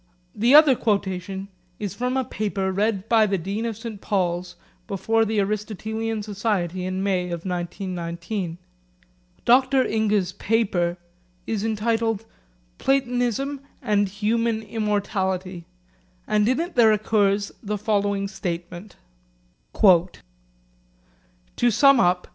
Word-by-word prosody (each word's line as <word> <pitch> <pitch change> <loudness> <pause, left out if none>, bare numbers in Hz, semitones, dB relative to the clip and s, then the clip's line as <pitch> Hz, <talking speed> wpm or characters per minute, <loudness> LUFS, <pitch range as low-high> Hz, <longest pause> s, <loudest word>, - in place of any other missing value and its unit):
The 235 +6 +4
other 300 -3 +8
quotation 195 -3 -2 0.3
is 205 -4 -4
from 250 +2 -1
a 260 - +1
paper 200 -3 -2
read 200 +1 0
by 225 -2 +4
the 195 -1 0
Dean 200 +6 -3
of 225 -3 -4
St 220 -3 -7
Paul's 180 -2 -1 0.3
before 225 +3 +1
the 220 0 0
Aristotelian 215 +2 -2
Society 195 -4 -2
in 185 +1 -2
May 185 -2 +1
of 170 -1 -5
1919. 175 0 -4 0.9
Dr 260 +2 +4
Inge's 210 -4 +1
paper 195 -5 0 0.5
is 215 -2 -2
entitled 225 0 0 0.5
'Platonism 270 +1 0 0.2
and 205 -6 +1
Human 220 +2 0
Immortality,' 195 -4 -2 0.6
and 210 +1 +2
in 255 - +1
it 345 +2 -3
there 230 -6 +5
occurs 205 -1 +1
the 210 -1 -3
following 200 -1 0
statement: 180 0 -6 0.9
'To 180 -2 +5 1.5
sum 270 +4 +5
up. 180 -3 +2
210 Hz, 115 wpm, -24 LUFS, 190-225 Hz, 1.5 s, other